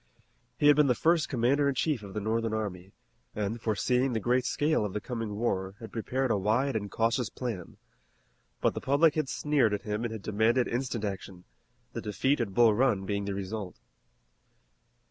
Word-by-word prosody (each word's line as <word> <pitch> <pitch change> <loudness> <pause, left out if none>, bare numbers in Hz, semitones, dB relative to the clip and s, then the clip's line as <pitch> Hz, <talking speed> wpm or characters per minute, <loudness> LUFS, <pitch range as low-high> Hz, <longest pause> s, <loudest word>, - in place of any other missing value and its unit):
He - - 0
had 145 0 +8
been 150 -1 +5
the 125 - +3
first 165 +2 +2
commander 135 +3 +2
in 140 - -2
chief 145 -4 0
of 100 -2 -10
the - - 0
Northern 110 +1 -1
army, 95 -3 -4 0.4
and, 110 +2 -2
foreseeing 125 +4 +1
the 110 - 0
great 125 +3 +1
scale 150 -3 +1
of 105 -3 -3
the 105 - -1
coming 115 -2 -4
war, 95 -4 -1
had 115 - -9
prepared 130 +3 -1
a - - +2
wide 115 +7 +1
and 100 -2 -2
cautious 115 +3 0
plan. 115 -9 -6 0.8
But - - +2
the - - -5
public 145 +3 +4
had 155 -4 -1
sneered 140 -8 +2
at 100 - -7
him 105 +1 -3
and 120 - -2
had 110 -3 -7
demanded 110 +4 +2
instant 120 -3 -2
action, 95 -2 -6 0.5
the - - -4
defeat 125 +7 0
at 100 -5 -3
Bull 115 -2 +6
Run 105 -4 +2
being 100 0 -2
the 100 -1 -3
result. 100 0 -5
115 Hz, 190 wpm, -29 LUFS, 105-130 Hz, 0.8 s, had